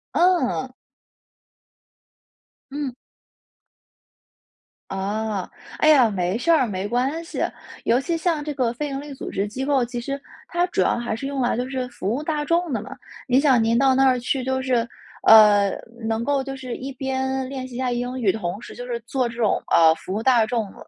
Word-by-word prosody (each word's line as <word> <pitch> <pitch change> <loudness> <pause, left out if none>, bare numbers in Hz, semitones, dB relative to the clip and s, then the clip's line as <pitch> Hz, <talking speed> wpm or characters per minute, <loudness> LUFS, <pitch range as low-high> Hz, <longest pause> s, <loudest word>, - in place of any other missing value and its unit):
嗯。 340 -8 +2 2.0
嗯。 280 -2 -3 2.0
啊， 200 +1 -2 0.3
哎 310 - +4
呀， 265 -7 +6
没 185 -2 -1
事 245 +9 -2
儿， 320 -6 +5
没 195 -3 -3
关 260 +8 -1
系， 335 - -3 0.4
尤 240 +3 +2
其 335 +4 -1
像 325 -2 0
这 300 - -4
个 245 -4 0
非 295 +5 -3
营 275 0 -4
利 290 0 -8
组 265 - -7
织 200 +2 -2
机 255 +6 -5
构， 270 -3 +2
其 240 0 -5
实， 275 +3 -4 0.3
它 350 +1 +1
主 - - 0
要 - - +2
还 235 -2 -2
是 275 +5 -5
用 280 -1 -3
来 245 - +1
就 250 +2 -3
是 260 -2 -3
服 210 -3 -3
务 290 - -4
大 300 -1 -1
众 335 0 0
的 220 - -1
嘛。 230 - -10 0.4
您 255 +1 +4
想 265 -5 +4
您 230 +1 +2
到 270 +1 +4
那 270 +1 +4
儿 255 -1 +3
去 255 +2 -1
就 260 +1 -1
是， 245 -3 +1 0.4
呃， 210 -2 +7 0.3
能 225 +1 -1
够 280 +1 0
就 270 0 -5
是 255 -2 -6
一 270 +2 -6
边 265 0 -2
练 260 -1 -5
习 250 - -11
一 - - -4
下 255 -1 -1
英 245 +1 -3
语， 210 -6 +3
同 195 -2 -4
时 235 - -10
就 245 - -7
是 240 -1 -3
做 250 0 -1
这 230 - -9
种， 225 -4 +1
呃， 160 -1 +6
服 175 - -9
务 220 - -2
大 245 -3 +5
众， 225 -5 -2
255 Hz, 215 characters per minute, -23 LUFS, 230-275 Hz, 2.0 s, 呃